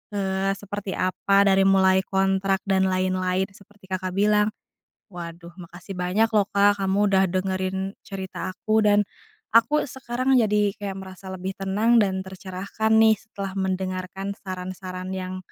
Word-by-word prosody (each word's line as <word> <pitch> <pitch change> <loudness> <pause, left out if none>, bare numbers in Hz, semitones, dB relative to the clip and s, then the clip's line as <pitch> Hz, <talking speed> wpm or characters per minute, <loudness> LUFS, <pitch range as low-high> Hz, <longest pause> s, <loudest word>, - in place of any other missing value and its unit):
eee, 195 0 0
seperti 200 -1 -5
apa, 195 +2 +2
dari 195 -1 +4
mulai 190 -1 +5
kontrak 195 0 +1
dan 190 -1 +2
lain-lain 185 0 0
seperti 195 0 -20
Kakak 185 -1 -3
bilang. 210 +1 +3 0.6
Waduh 170 -1 -9
makasih 175 +1 -10
banyak 180 +5 +1
loh, 205 - +5
Kak, 200 0 +3
kamu 190 +1 +1
udah 190 -1 +4
dengerin 185 0 -1 0.3
cerita 190 -1 -5
aku, 215 +3 +1
dan 205 0 +5 0.5
aku 295 +7 +4
sekarang 255 0 -1
jadi 210 -3 +3
kayak 200 -3 -5
merasa 190 0 -9
lebih 190 +1 -5
tenang 215 +5 +3
dan 190 -2 -1
tercerahkan 190 +3 -4
nih 220 0 +6
setelah 200 -2 -7
mendengarkan 190 0 -3
saran-saran 185 0 -6
yang 185 0 -4
190 Hz, 140 wpm, -24 LUFS, 185-205 Hz, 0.6 s, nih